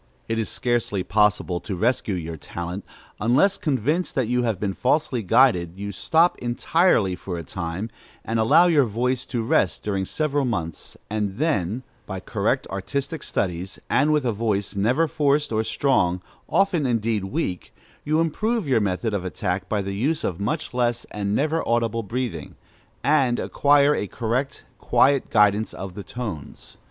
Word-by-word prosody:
It 115 Hz, 0 st, -1 dB
is 110 Hz, -, -2 dB
scarcely 120 Hz, -6 st, -1 dB
possible 105 Hz, -3 st, +2 dB
to 95 Hz, +1 st, -5 dB
rescue 110 Hz, 0 st, 0 dB
your 85 Hz, -2 st, -5 dB
talent, 85 Hz, +4 st, -6 dB, 0.4 s
unless, 135 Hz, -, +3 dB
convinced 150 Hz, -, 0 dB
that 130 Hz, -4 st, +1 dB
you 125 Hz, +1 st, +1 dB
have 115 Hz, -6 st, -1 dB
been 100 Hz, -1 st, -1 dB
falsely 125 Hz, +1 st, +1 dB
guided, 90 Hz, -4 st, +3 dB
you 100 Hz, +1 st, -4 dB
stop 165 Hz, -, +2 dB
entirely 120 Hz, -, +2 dB
for 90 Hz, -1 st, -6 dB
a 85 Hz, -, -5 dB
time, 90 Hz, +6 st, -5 dB, 0.3 s
and 115 Hz, 0 st, -1 dB
allow 115 Hz, +10 st, +6 dB
your 155 Hz, -6 st, +4 dB
voice 125 Hz, +3 st, -1 dB
to 120 Hz, -3 st, -2 dB
rest 95 Hz, -6 st, +1 dB
during 100 Hz, -2 st, -1 dB
several 145 Hz, +4 st, 0 dB
months, 90 Hz, -10 st, -4 dB
and 105 Hz, -2 st, -2 dB
then, 125 Hz, -, 0 dB, 0.2 s
by 95 Hz, -1 st, -4 dB
correct -, -, -1 dB
artistic 140 Hz, -, -3 dB
studies, 90 Hz, 0 st, -3 dB
and 145 Hz, +3 st, +3 dB
with 150 Hz, -3 st, +2 dB
a 120 Hz, -, +2 dB
voice 105 Hz, -2 st, -1 dB
never 125 Hz, +11 st, +2 dB
forced 145 Hz, -1 st, +1 dB
or 110 Hz, 0 st, +1 dB
strong, 90 Hz, -9 st, +1 dB, 0.3 s
often 175 Hz, -6 st, +2 dB
indeed 115 Hz, -4 st, 0 dB
weak, 95 Hz, -, -3 dB, 0.3 s
you 155 Hz, +2 st, +1 dB
improve 210 Hz, +5 st, 0 dB
your 125 Hz, -5 st, +3 dB
method 105 Hz, +3 st, -1 dB
of 100 Hz, -3 st, -1 dB
attack 90 Hz, +1 st, -3 dB
by 105 Hz, -2 st, 0 dB
the 100 Hz, 0 st, -4 dB
use 140 Hz, +11 st, 0 dB
of 90 Hz, -1 st, -2 dB
much 150 Hz, +11 st, -2 dB
less 120 Hz, -1 st, 0 dB
and 100 Hz, 0 st, -2 dB
never 155 Hz, +3 st, +1 dB
audible 115 Hz, -1 st, +1 dB
breathing, 115 Hz, -, -4 dB, 0.5 s
and 135 Hz, -5 st, +3 dB
acquire 145 Hz, 0 st, +3 dB
a 105 Hz, -, -2 dB
correct, 125 Hz, +6 st, -2 dB, 0.2 s
quiet 140 Hz, 0 st, +3 dB
guidance 105 Hz, 0 st, +3 dB
of 95 Hz, -1 st, -6 dB
the 100 Hz, -, -7 dB
tones. 105 Hz, -, -7 dB
115 Hz, 165 wpm, -24 LUFS, 95-140 Hz, 0.5 s, allow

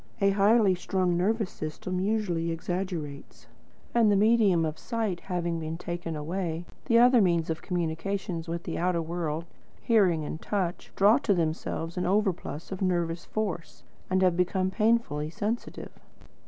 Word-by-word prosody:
A 200 Hz, -1 st, +4 dB
highly 205 Hz, 0 st, +4 dB
strung 180 Hz, 0 st, 0 dB
nervous 205 Hz, +3 st, 0 dB
system 170 Hz, +4 st, -4 dB
usually 185 Hz, -5 st, 0 dB
exaggerates. 165 Hz, -3 st, -4 dB, 0.5 s
And 230 Hz, -3 st, +4 dB
the -, -, +4 dB
medium 205 Hz, -5 st, +4 dB
of 155 Hz, 0 st, -4 dB
sight 220 Hz, -7 st, -2 dB
having 170 Hz, -3 st, -2 dB
been 160 Hz, 0 st, -4 dB
taken 175 Hz, -1 st, -4 dB
away, 165 Hz, +2 st, -3 dB, 0.2 s
the 230 Hz, -3 st, +4 dB
other 245 Hz, 0 st, +6 dB
means 170 Hz, -4 st, +2 dB
of 160 Hz, -, -4 dB
communication 175 Hz, +1 st, -2 dB
with 170 Hz, +1 st, -4 dB
the 165 Hz, -, -4 dB
outer 175 Hz, -1 st, +1 dB
world, 165 Hz, -1 st, -3 dB, 0.3 s
hearing 190 Hz, -9 st, +3 dB
and 155 Hz, -, -5 dB
touch, 185 Hz, -4 st, -2 dB
draw 205 Hz, +6 st, +5 dB
to 210 Hz, -8 st, +1 dB
themselves 165 Hz, 0 st, -2 dB
an 180 Hz, -, 0 dB
overplus 190 Hz, -5 st, -1 dB
of 190 Hz, -, -5 dB
nervous 175 Hz, -2 st, 0 dB
force, 195 Hz, -6 st, -4 dB, 0.3 s
and 185 Hz, 0 st, +2 dB
have 180 Hz, -2 st, +4 dB
become 185 Hz, +1 st, +1 dB
painfully 210 Hz, -8 st, +1 dB
sensitive. 210 Hz, +8 st, -4 dB
180 Hz, 150 wpm, -28 LUFS, 165-200 Hz, 0.5 s, other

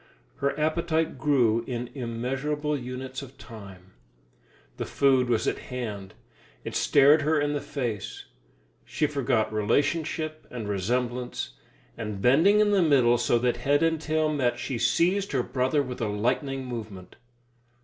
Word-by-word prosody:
Her 140 Hz, +1 st, -1 dB
appetite 160 Hz, -1 st, 0 dB
grew 120 Hz, -6 st, +2 dB
in 120 Hz, -1 st, -4 dB
immeasurable 135 Hz, +5 st, -2 dB
units 130 Hz, 0 st, -6 dB
of 135 Hz, -1 st, -12 dB
time. 100 Hz, -5 st, -12 dB, 0.8 s
The -, -, -3 dB
food 130 Hz, -3 st, +3 dB
was 115 Hz, -3 st, +1 dB
at -, -, -1 dB
hand, 105 Hz, -6 st, -5 dB, 0.5 s
it -, -, -6 dB
stared 145 Hz, +2 st, +5 dB
her 155 Hz, +1 st, +2 dB
in 145 Hz, 0 st, 0 dB
the 145 Hz, -, -2 dB
face; 115 Hz, -8 st, -4 dB, 0.6 s
she 155 Hz, -, -1 dB
forgot 130 Hz, -7 st, 0 dB
relationship 155 Hz, +8 st, -1 dB
and 115 Hz, -4 st, -6 dB
resemblance, 120 Hz, -, -2 dB, 0.4 s
and 105 Hz, -3 st, -5 dB
bending 165 Hz, -, +5 dB
in 210 Hz, -1 st, +3 dB
the 200 Hz, -2 st, +4 dB
middle 130 Hz, -7 st, +4 dB
so 120 Hz, 0 st, +2 dB
that 120 Hz, -1 st, +1 dB
head 145 Hz, +5 st, +2 dB
and 165 Hz, -1 st, +1 dB
tail 155 Hz, 0 st, 0 dB
met, 125 Hz, -4 st, 0 dB
she 125 Hz, -1 st, -4 dB
seized 185 Hz, -, +1 dB
her 130 Hz, -3 st, +1 dB
brother 130 Hz, +4 st, 0 dB
with 125 Hz, -2 st, -7 dB
a 110 Hz, -, 0 dB
lightning 130 Hz, +6 st, -1 dB
movement. 105 Hz, -7 st, -8 dB
130 Hz, 145 wpm, -26 LUFS, 115-150 Hz, 0.8 s, stared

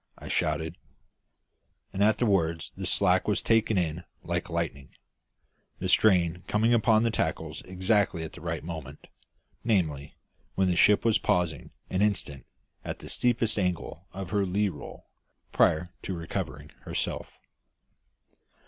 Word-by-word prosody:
I -, -, -9 dB
shouted; 80 Hz, +2 st, -1 dB, 1.1 s
and 100 Hz, -, +1 dB
at 110 Hz, 0 st, +4 dB
the 120 Hz, -, +1 dB
words 85 Hz, -6 st, +1 dB
the -, -, -4 dB
slack -, -, +2 dB
was -, -, +2 dB
taken 115 Hz, -2 st, +3 dB
in 85 Hz, -1 st, -1 dB, 0.2 s
like -, -, -2 dB
lightning, 70 Hz, 0 st, -3 dB, 0.9 s
the -, -, -3 dB
strain 90 Hz, -4 st, +4 dB
coming 110 Hz, +3 st, +2 dB
upon 110 Hz, -1 st, +4 dB
the 115 Hz, -, +2 dB
tackles -, -, -2 dB
exactly 95 Hz, -2 st, +1 dB
at 80 Hz, -, -7 dB
the -, -, -11 dB
right 80 Hz, -1 st, -3 dB
moment, 80 Hz, -4 st, -7 dB, 0.6 s
namely, 80 Hz, -11 st, 0 dB, 0.4 s
when 95 Hz, -1 st, +2 dB
the 90 Hz, -, +1 dB
ship 105 Hz, +5 st, +5 dB
was 115 Hz, -2 st, +4 dB
pausing 85 Hz, -6 st, 0 dB, 0.2 s
an 95 Hz, -, +1 dB
instant 95 Hz, -10 st, -1 dB, 0.4 s
at -, -, -5 dB
the -, -, -10 dB
steepest 115 Hz, -3 st, +1 dB
angle 90 Hz, -1 st, -2 dB
of 95 Hz, -1 st, -6 dB
her 100 Hz, -1 st, +2 dB
lee 100 Hz, +2 st, +1 dB
roll, 75 Hz, -6 st, -10 dB, 0.5 s
prior 85 Hz, +3 st, +3 dB
to 95 Hz, -, -4 dB
recovering 75 Hz, -4 st, -5 dB
herself. -, -, -3 dB
90 Hz, 140 wpm, -28 LUFS, 80-105 Hz, 1.1 s, ship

